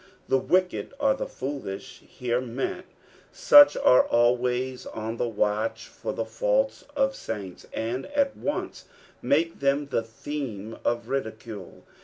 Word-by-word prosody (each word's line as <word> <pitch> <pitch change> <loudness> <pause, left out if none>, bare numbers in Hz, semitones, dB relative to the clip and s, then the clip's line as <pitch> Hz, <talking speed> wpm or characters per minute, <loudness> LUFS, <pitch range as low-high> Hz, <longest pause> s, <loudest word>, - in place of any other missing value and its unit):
The 135 - +3
wicked 185 - 0
are 280 -1 +4
the 270 - -4
foolish 130 -8 -6
here 125 0 -2
meant: 125 +1 -4 0.4
such 145 0 +7
are 125 - +6
always 125 +2 +1
on 110 +1 -5
the 120 - 0
watch 105 0 -1
for - - -6
the - - -3
faults - - 0
of 270 0 +2
snintB, 100 - -6
and 120 +4 -3
at 280 -1 +1
onre 290 - -4 0.4
make 165 +3 +1
them 140 +1 +1
(he - - +2
theroe 115 -2 -6
of 120 -1 -1
ridicule. 110 -6 -5
125 Hz, 135 wpm, -26 LUFS, 115-150 Hz, 0.4 s, such